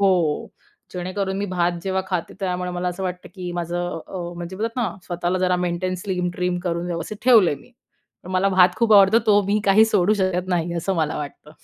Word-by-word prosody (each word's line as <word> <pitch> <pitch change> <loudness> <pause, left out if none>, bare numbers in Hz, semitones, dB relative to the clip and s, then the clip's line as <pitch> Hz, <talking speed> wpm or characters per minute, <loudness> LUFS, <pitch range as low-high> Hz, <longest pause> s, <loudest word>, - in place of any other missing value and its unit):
हो, 200 - +4 0.9
जेणेकरून 190 +2 -3
मी 205 - -1
भात 175 -1 0
जेव्हा 190 0 -1
खाते, 180 -4 -3
त्यामुळं 180 -1 -2
मला 180 0 -2
असं 180 +2 -5
वाटतं 180 -1 -4
की 180 -2 -5
माझं 175 0 -3
अ, 190 - -8 0.2
म्हणजे 175 +2 -6
बोलतात 225 +3 -3
ना, 210 - 0 0.2
स्वतःला 175 +1 -1
जरा 180 0 +2
मेंटेन, 180 +1 -1
स्लिम-ट्रिम 180 -1 -2
करून 170 0 -2
व्यवस्थित 170 +4 -4
ठेवलंय 220 - +6
मी. 250 - -17 0.5
पण 185 - -10
मला 185 +1 +2
भात 185 -1 +4
खूप 230 -1 +2
आवडतो, 200 +3 +7
तो 205 -1 +5
मी 210 +1 +1
काही 205 +3 +6
सोडू 210 -2 +2
शकत 185 0 -1
नाही, 170 -1 0
असं 190 +3 -1
मला 155 -2 0
वाटतं. 150 +1 -8
180 Hz, 195 wpm, -22 LUFS, 175-195 Hz, 0.9 s, आवडतो